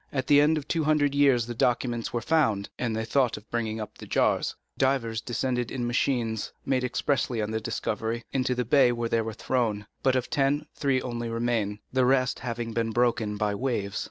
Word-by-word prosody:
At 130 -2 -1
the 145 +1 +6
end 155 +2 +3
of 150 -1 -5
two 160 -1 0
hundred 150 -2 +3
years 135 -5 +4
the 120 - -5
documents 120 0 0
were 120 -1 -2
found, 115 -10 +2
and 120 -3 -1
they 110 0 -2
thought 125 +1 +1
of 105 0 -13
bringing 110 -2 -2
up 110 - -7
the - - -9
jars. - - +1 0.2
Divers 120 -4 0
descended 125 0 -1
in 125 -3 -3
machines, 120 -3 0
made 130 -2 +1
expressly 125 -1 0
on 105 0 -1
the 110 0 -2
discovery, 115 +2 -3
into 130 -1 0
the 125 0 -1
bay 130 0 +5
where 120 -1 -2
they 115 - +2
were 110 0 -4
thrown; 110 -3 -1 0.2
but 130 -1 +2
of 130 -1 0
ten 140 0 +1
three 135 -2 0
only 120 -1 -3
remained, 115 -3 -1
the 130 -1 +3
rest 130 0 +2
having 115 -1 -4
been 115 0 0
broken 115 -2 +1
by 105 0 0
the 100 - -3
waves. 105 -7 -1
120 Hz, 210 wpm, -27 LUFS, 110-130 Hz, 0.2 s, the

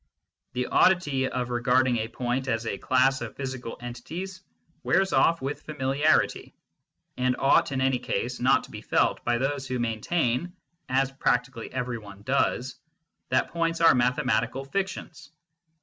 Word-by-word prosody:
The 125 0 -1
oddity 145 -8 +3
of 125 -1 -3
regard 125 +2 +3
ing 120 -2 +1
a 110 - -2
point 125 +3 -2
as 115 -2 -1
a 100 - -3
class 130 +1 +2
of 115 -2 -6
physical 130 -3 -5
entities 165 +11 -7 0.4
wears 190 +1 +2
off 165 -3 +3
with 140 +2 -3
familiarity, 145 +1 +1 0.6
and 125 0 +1
ought 135 +1 +3
in 135 -1 -1
any 130 -1 +2
case - - -3
not - - +3
to - - -13
be - - -8
felt - - +1
by 120 0 +1
those 135 +1 -2
who 130 0 -2
maintain, 120 +7 -1 0.4
as 135 +1 +1
practically 125 -2 -1
every 125 -2 -3
one 100 -1 -13
does, 130 0 0 0.5
that - - +1
points 165 0 -1
are 165 0 +7
mathematical 125 0 +1
fictions. 190 -1 -4
130 Hz, 150 wpm, -26 LUFS, 120-140 Hz, 0.6 s, are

